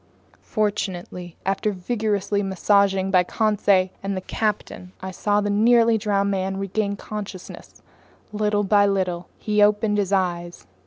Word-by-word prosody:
Fortunately, 185 -5 -3
after 195 +2 0
vigorous 205 0 -2
massaging 195 -1 +2
by 185 -1 +5
Conseil 200 -2 +2
and 195 0 -3
the - - -3
captain, 200 -3 -3
I 190 0 -6
saw 205 +3 0
the 205 0 -1
nearly 230 +1 +4
drowned 200 -1 0
man 190 0 -2
regain 200 +1 -2
consciousness 200 -3 -9 0.5
little 210 0 +1
by 205 0 +4
little. 180 -3 -1
He 210 -1 0
opened 210 0 +3
his 195 -1 -1
eyes. 175 -3 -1
200 Hz, 135 wpm, -23 LUFS, 190-210 Hz, 0.5 s, by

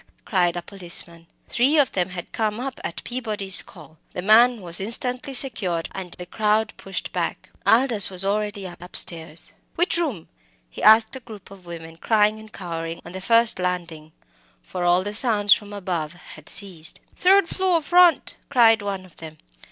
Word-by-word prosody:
cried 175 -3 +1
a 175 - -4
policeman. 170 -3 0 0.2
Three 270 +6 +2
of 285 -4 +3
them 180 -1 -1
had 180 -1 -8
come 215 0 -2
up 265 +1 -5
at - - -5
Peabody's 215 -6 -1
call. 160 -4 -15
The 180 - -4
man 230 +4 +5
was 175 -1 -5
instantly 250 +6 0
secured, 190 -11 +2
and 185 -2 -7
the 180 - -7
crowd 215 +3 0
pushed 195 -1 -6
back. - - -4 0.2
Aldous 230 -4 +3
was 185 0 +1
already 205 0 -2
upstairs. 170 -2 -3 0.2
"Which 350 0 +1
room?" 265 - -3 0.4
he - - -10
asked 220 +2 +6
of 260 - -8
a - - -39
group 210 -4 -12
of 190 -3 -14
women 165 -1 -9
crying 215 +2 +2
and 215 0 -14
cowering 165 -3 -6
on 170 - -9
the 190 +1 -7
first 230 +1 +3
landing 170 -4 -4 0.5
for 180 -1 -5
all 175 +2 +3
sounds 210 -3 +4
from 205 -1 -4
above 180 -6 -4
had 175 - -11
ceased. 185 -5 -5 0.2
"Third 385 0 +4
floor 370 -1 +1
front," 350 +2 +3
cried 230 -4 +5
one 195 -2 -4
of 180 - -20
them. 160 -1 -10
200 Hz, 170 wpm, -23 LUFS, 175-230 Hz, 0.5 s, asked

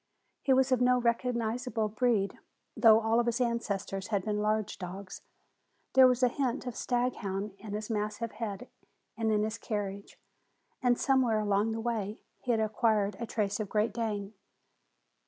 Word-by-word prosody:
He 270 - +1
was 265 0 +4
of 255 -1 +3
no 250 0 +4
recognizable 235 -1 0
breed, 215 -2 0 0.4
though 220 -2 +7
all 225 +1 +2
of 240 - +1
his 235 +1 0
ancestors 205 -5 -2
had 205 -3 -1
been 210 -1 -1
large 215 -1 0
dogs. 185 +1 -7 0.7
There 260 -1 +8
was 250 0 +1
a - - +7
hint 260 0 -2
of 250 - -4
staghound 210 -5 -2
in 215 -2 -7
his 215 +2 -4
massive 215 +2 -2
head 220 +1 -5 0.5
and 225 -1 0
in 210 -1 +2
his 215 0 -3
carriage, 200 -2 -4 0.6
and 245 -1 +3
somewhere 260 -5 +3
along 210 +1 +1
the 225 - -3
way 220 -2 -3 0.2
he 255 - -10
had 230 -2 +3
acquired 215 -2 +1
a 235 - -4
trace 205 -2 -1
of 210 -3 -3
Great 210 0 +1
Dane. 215 -3 -3
220 Hz, 165 wpm, -30 LUFS, 210-240 Hz, 0.7 s, There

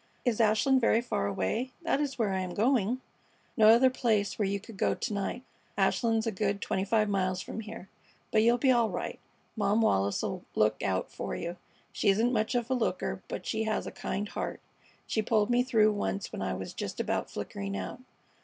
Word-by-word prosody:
Is 235 -2 +2
Ashland 225 +5 +4
very 230 -1 +4
far 235 - -1
away? 220 - -2
That 295 - +1
is 275 -3 -2
where 215 -5 +1
I 190 - 0
am 185 -1 -4
going." 245 +1 +2 0.5
"No 220 -4 +6
other 245 +3 +6
place 220 -6 0
where 205 - +2
you 200 +1 -1
could 220 +2 -12
go - - +1
to - - -3
night. 200 +5 -3 0.3
Ashland's 225 -2 +2
a 225 - 0
good 200 0 -1
twenty 190 - -1
five 215 +1 +2
miles 185 -2 0
from - - -6
here. 220 -2 -8 0.4
But 215 - +4
you'll 235 +2 +4
be 260 +1 +4
all 235 -3 +3
right. - - -4 0.4
Mom 205 0 +2
Wallis 100 - +2
'll - - -3
look 105 0 +2
out 95 -2 -1
for - - -4
you. 170 +1 -4 0.4
She 205 - +1
isn't 225 +6 +3
much 220 +2 0
of 240 +1 -1
a - - +4
looker, 245 -3 -1
but - - -5
she 220 0 -1
has 220 - -1
a - - -5
kind 205 +2 -3
heart. - - -4 0.5
She 220 - 0
pulled 215 +1 +2
me 240 0 +4
through 225 -4 +4
once 95 - -3
when - - -4
I - - -1
was - - -6
just - - -5
about - - -1
flickering 100 0 -5
out. 95 - -5
220 Hz, 210 wpm, -30 LUFS, 195-235 Hz, 0.5 s, No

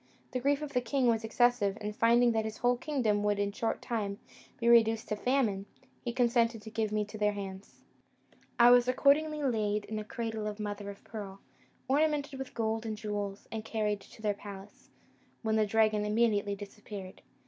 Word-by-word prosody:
The 255 - -1
grief 280 +3 +1
of 295 - -6
the 250 - +2
king 255 +2 0
was 230 -2 +2
excessive; 225 -3 +2
and, 210 0 -4
finding 235 +2 +4
that 220 -1 +1
his 220 0 -5
whole 245 0 +2
kingdom 240 -6 0
would 205 0 +1
in 200 0 0
a - - -10
short 225 +2 -2
time 205 -4 -2 0.4
be 235 - 0
reduced 225 -1 +5
to 210 - 0
famine, 215 -5 0 0.4
he 240 - -2
consented 235 -2 +2
to 220 - -9
give 220 -1 -1
me 215 0 +1
into 210 +1 -6
their 210 0 +2
hands. 195 -1 -8 0.7
I 240 0 +8
was 245 0 +6
accordingly 295 +4 +3
laid 215 -5 0
in 215 0 -4
a - - -4
cradle 220 -1 -4
of 210 0 -5
mother 205 -1 -4
o' 200 - -7
pearl, 200 -2 -8 0.5
ornamented 285 0 +1
with 265 - -7
gold 225 -1 -1
and 220 -2 -4
jewels, 205 -2 -4
and 220 -1 -4
carried 210 -2 -1
to 220 - -15
their 210 -1 +2
palace, 200 0 -11 0.5
when 220 -1 +1
the 215 -1 +3
dragon 215 0 +3
immediately 210 -2 +1
disappeared. 200 -1 -9
220 Hz, 190 wpm, -31 LUFS, 205-240 Hz, 0.7 s, I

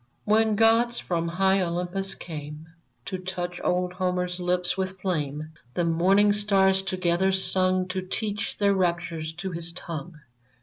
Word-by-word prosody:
When 220 0 +3
gods 230 +2 +4
from 170 -2 -1
high 190 +3 +2
Olympus 180 +2 -2
came 150 -1 -8 0.4
To 185 - -4
touch 180 -1 -4
old 180 0 0
Homer's 180 -1 -1
lips 180 0 +1
with 190 0 -3
flame, 155 -4 -2 0.2
The 175 - +1
morning 190 +5 +4
stars 195 -2 +3
together 185 -1 +1
sung 185 -1 +1
To 185 0 -2
teach 205 +2 -3
their 200 -1 +3
raptures 170 -3 -1
to 185 +3 -5
his 170 0 -4
tongue. 165 -1 -6
185 Hz, 140 wpm, -26 LUFS, 170-195 Hz, 0.4 s, gods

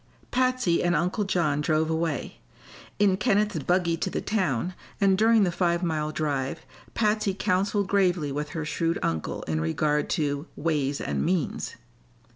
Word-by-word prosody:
Patsy 255 -8 +2
and 175 0 +2
Uncle 180 +6 0
John 155 -6 +1
drove 155 +1 +1
away. 160 -3 -2 0.6
In 200 -2 +3
Kenneth's 210 -5 +1
buggy 175 +2 +1
to 185 - -2
the - - -2
town, 185 - -1 0.3
and 195 -2 +4
during 220 +1 +4
the 180 - +2
five 170 0 0
mile 155 -3 -1
drive 140 -4 -2 0.3
Patsy 210 -3 +1
counseled 195 +2 +1
gravely 180 -7 +2
with 150 +2 -3
her 160 - -2
shrewd 165 +2 0
uncle 80 -1 -2
in 80 0 -2
regard 150 - 0
to 145 -1 -1
"ways 145 -3 -1
and - - -1
means." 175 -3 -1
170 Hz, 150 wpm, -26 LUFS, 150-195 Hz, 0.6 s, and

